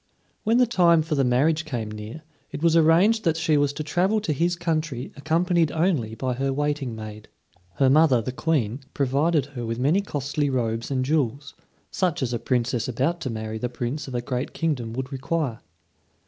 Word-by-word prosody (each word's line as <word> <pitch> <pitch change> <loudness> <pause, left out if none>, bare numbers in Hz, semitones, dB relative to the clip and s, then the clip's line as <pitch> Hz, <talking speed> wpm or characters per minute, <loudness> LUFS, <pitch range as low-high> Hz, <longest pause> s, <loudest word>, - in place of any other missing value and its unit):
When 225 +2 +3
the 250 - +5
time 170 -8 +4
for 160 0 -3
the 140 -2 +2
marriage 145 +6 +2
came 120 -8 -4
near, 110 +8 -8 0.3
it 150 - -6
was 165 -1 +4
arranged 175 +8 +4
that 165 -3 +1
she 160 -1 +2
was 145 -1 +2
to 155 - -4
travel 185 +7 +1
to 165 -7 -1
his 170 +4 +1
country 155 -6 -2
accompanied 165 +3 +1
only 155 - 0
by 130 +2 -2
her 135 +2 -1
waiting 145 -3 -1
maid. 110 -1 -9 0.5
Her 135 - +3
mother, 140 -2 +5
the 115 +3 -3
Queen, 130 -5 -1 0.2
provided 145 +2 +1
her 120 -3 -5
with 115 0 -3
many 145 +10 +2
costly 145 -5 -2
robes 115 -3 -1
and 130 -2 0
jewels, 140 -1 -1 0.4
such 180 -7 0
as 120 -1 -2
a 120 - -1
Princess 120 -1 0
about 135 +8 -1
to 130 - -3
marry 110 -1 -4
the 125 - -2
Prince 125 +5 -4
of 130 - -6
a 120 - 0
great 125 0 -3
kingdom 130 -9 -2
would 130 +2 -4
require. 135 -2 -2
140 Hz, 190 wpm, -24 LUFS, 125-165 Hz, 0.5 s, the